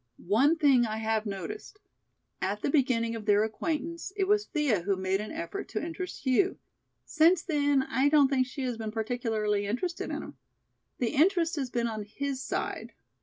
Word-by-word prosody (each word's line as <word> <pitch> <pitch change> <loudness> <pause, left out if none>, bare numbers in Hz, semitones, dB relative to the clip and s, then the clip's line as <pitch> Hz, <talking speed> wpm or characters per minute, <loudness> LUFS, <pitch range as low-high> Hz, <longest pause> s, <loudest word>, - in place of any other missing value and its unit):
One 280 +9 +5
thing 275 -5 +5
I 220 -2 -2
have 220 0 -1
noticed. 305 - -6 0.6
At 200 +2 -2
the - - +1
beginning 240 -5 +2
of 220 -2 -7
their 205 0 +5
acquaintance 325 - -3
it 395 - +2
was 415 +1 +2
Thea 290 - +1
who 195 +3 0
made 190 +1 -1
an 215 - -6
effort 335 +5 -5
to - - -3
interest 345 +2 -6
Hugh, 270 +9 +2 0.5
since 330 +2 +4
then 285 -4 +2
I 265 +3 +2
don't 290 -2 +5
think 260 -2 +1
she 270 +1 -6
has 250 -3 -2
been 220 -1 -4
particularly 220 -3 -1
interested 340 - -2
in - - -4
him. - - -11 0.6
The 240 - 0
interest 335 +2 +3
has 270 -3 -2
been 240 -1 -1
on 220 -2 -3
his 275 +5 -4
side. - - -4
260 Hz, 180 wpm, -29 LUFS, 220-315 Hz, 0.6 s, One